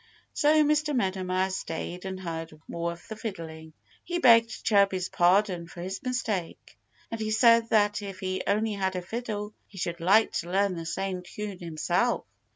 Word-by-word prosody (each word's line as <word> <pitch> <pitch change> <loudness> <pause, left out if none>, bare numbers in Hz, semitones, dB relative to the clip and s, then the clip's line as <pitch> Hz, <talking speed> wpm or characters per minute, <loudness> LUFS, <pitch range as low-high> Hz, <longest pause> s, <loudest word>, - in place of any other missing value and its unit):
So 305 +1 +4
Mr. 300 0 +1
Meadow 190 -5 0
Mouse 185 +1 0
stayed 175 +3 -5
and 190 0 -4
heard 165 -3 -6
more 170 0 -2
of 170 0 -12
the 220 - -6
fiddling. 165 -7 -7 0.3
He 350 - -2
begged 230 -6 +5
Chirpy's 195 -3 +3
pardon 180 -1 +2
for 170 - -10
his 190 +2 -5
mistake. 225 -9 -3 0.4
And 225 -1 -4
he 215 - -1
said 230 +1 +5
that 205 -1 +3
if 195 -2 -7
he 185 0 -2
only 215 +2 +1
had 190 -2 -1
a 180 - -3
fiddle 210 0 -4
he 195 - -15
should 170 -1 -3
like 200 +6 +4
to 170 - -6
learn 195 +1 +2
the 165 -1 -6
same 190 +2 -2
tune 200 +1 -7
himself. 165 -3 0
195 Hz, 175 wpm, -28 LUFS, 175-220 Hz, 0.4 s, begged